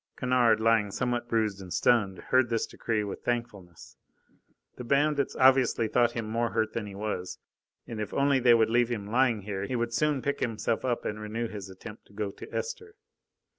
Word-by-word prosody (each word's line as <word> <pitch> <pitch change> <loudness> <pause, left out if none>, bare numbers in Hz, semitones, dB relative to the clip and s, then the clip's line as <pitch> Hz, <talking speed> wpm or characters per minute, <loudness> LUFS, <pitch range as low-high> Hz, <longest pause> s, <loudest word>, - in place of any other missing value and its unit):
Kennard, 125 -4 +3
lying 110 -2 +3
somewhat 120 +3 -2
bruised 110 -4 0
and 90 -2 -10
stunned, 105 -5 +2
heard 130 -2 +4
this 115 -1 0
decree 110 -2 -2
with 100 - -6
thankfulness. 105 -9 -5 0.8
The 125 - -6
bandits 140 +2 +1
obviously 130 -3 +4
thought 120 +2 +2
him 115 -2 -4
more 115 +2 0
hurt 110 -1 0
than 110 -3 -3
he 100 - -9
was, 100 -3 -4 0.5
and 110 -2 -6
if 105 - -4
only 140 -1 +2
they 120 -1 +6
would 110 -1 +2
leave 120 0 +3
him 110 -4 -3
lying 120 0 +2
here, 100 0 -4
he 125 - -3
would 120 -1 -2
soon 150 -1 +1
pick 140 - -1
himself 115 -1 -1
up 125 -2 -1
and 105 - -3
renew 110 +2 -3
his 100 -3 -8
attempt 100 +3 -11
to - - -21
go 105 -1 -3
to - - -12
Esther. 450 -2 -5
115 Hz, 195 wpm, -28 LUFS, 105-125 Hz, 0.8 s, they